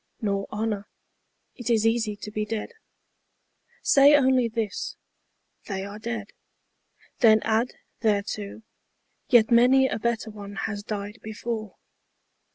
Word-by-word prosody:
Nor 200 -2 -1
honour. 210 -1 -2 0.7
It 245 -1 -5
is 225 -2 +3
easy 225 -2 +1
to 210 +1 -8
be 215 0 -2
dead. 215 - -4 1.1
Say 280 +1 +7
only 260 -3 +4
this, 220 -3 -3 0.3
" - - -45
They 195 -2 -3
are 205 +1 -8
dead." 220 -2 -5 0.9
Then 220 -3 +6
add 225 +3 0 0.2
thereto, 210 0 -1 0.3
" - - -48
Yet 235 -3 +5
many 255 +3 +6
a - - -3
better 230 0 -1
one 205 -1 -9
has 205 0 -3
died 205 +1 -5
before." 220 -1 -5
220 Hz, 130 wpm, -26 LUFS, 210-235 Hz, 1.1 s, Say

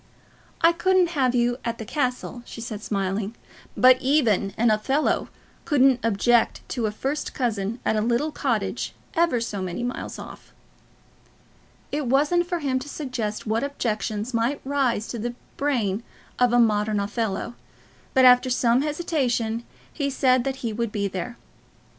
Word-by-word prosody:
"I 330 - +6
couldn't 365 +1 +3
have 260 -6 +1
you 245 +1 +1
at 235 0 -2
the 220 - -6
castle," 250 -1 -2
she 240 - -10
said, 220 -2 -5
smiling; 200 +1 -2 0.4
"but 255 0 +6
even 240 -8 +2
an 235 0 +4
Othello 265 +8 +1 0.3
couldn't 270 -4 +4
object 230 +2 +2
to 235 -4 -1
a - - -2
first 270 +7 -3
cousin 225 -2 -1
at - - +2
a 215 - +1
little 240 +7 +1
cottage - - -2 0.2
ever 335 -8 +2
so 210 -4 -3
many 185 +5 -3
miles 245 +1 -4
off." - - -11 1.4
It 290 -2 -2
wasn't 300 +7 +2
for 350 -2 -2
him 265 -3 0
to 275 +3 -8
suggest 250 -8 -4
what 220 +2 0
objections 225 -4 -2
might 235 +5 0
rise 265 -6 0
to 235 - -4
the 240 +2 -3 0.2
brain 230 -8 0 0.4
of 250 -1 +4
a 240 - +4
modern 210 -2 +3
Othello; 210 +2 -2 0.6
but 260 -1 +6
after 250 0 +7
some 245 0 +3
hesitation 265 -7 -1 0.3
he 285 -3 -1
said 255 -2 +2
that 270 -1 -1
he 225 - -1
would 230 0 -2
be 200 -1 -1
there. 200 +6 -5
240 Hz, 155 wpm, -24 LUFS, 220-275 Hz, 1.4 s, after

